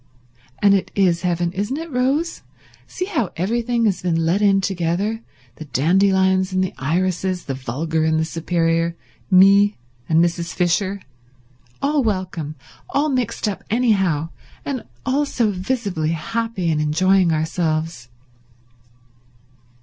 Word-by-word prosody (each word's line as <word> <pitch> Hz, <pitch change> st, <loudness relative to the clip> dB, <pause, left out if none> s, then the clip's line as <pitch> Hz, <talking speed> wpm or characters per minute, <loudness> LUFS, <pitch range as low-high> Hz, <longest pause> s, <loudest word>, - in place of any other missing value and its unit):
And 200 Hz, -1 st, +6 dB
it 195 Hz, -, +1 dB
is 180 Hz, -4 st, +2 dB
heaven, 175 Hz, -1 st, 0 dB
isn't 205 Hz, +8 st, -2 dB
it, 330 Hz, 0 st, -6 dB
Rose? 275 Hz, +6 st, 0 dB, 0.5 s
See 365 Hz, -, -4 dB
how 300 Hz, -, -1 dB
everything 230 Hz, +5 st, 0 dB
has 200 Hz, -4 st, +1 dB
been 175 Hz, -2 st, 0 dB
let 180 Hz, +5 st, +1 dB
in 200 Hz, -1 st, +4 dB
together—the 175 Hz, -, -3 dB
dandelions 190 Hz, +5 st, +2 dB
and 185 Hz, 0 st, +1 dB
the 185 Hz, -, -3 dB
irises, 180 Hz, +4 st, -1 dB
the 135 Hz, -, -3 dB
vulgar 150 Hz, +5 st, -2 dB
and 160 Hz, 0 st, +2 dB
the 160 Hz, -, +1 dB
superior, 165 Hz, 0 st, 0 dB, 0.3 s
me 200 Hz, +2 st, +6 dB, 0.3 s
and 160 Hz, -, +3 dB
Mrs. 170 Hz, 0 st, 0 dB
Fisher—all 130 Hz, -, -3 dB
welcome, 185 Hz, -8 st, -2 dB, 0.3 s
all 295 Hz, +2 st, +1 dB
mixed 255 Hz, -5 st, -1 dB
up 205 Hz, -, -4 dB
anyhow, 195 Hz, -10 st, +1 dB, 0.4 s
and 270 Hz, -4 st, -4 dB, 0.2 s
all 280 Hz, +3 st, +1 dB
so 230 Hz, -6 st, +1 dB
visibly 185 Hz, -5 st, -2 dB
happy 205 Hz, +1 st, -2 dB
and 150 Hz, -1 st, 0 dB
enjoying 185 Hz, +4 st, +3 dB
ourselves." 160 Hz, -4 st, -1 dB
185 Hz, 125 wpm, -21 LUFS, 160-210 Hz, 0.5 s, And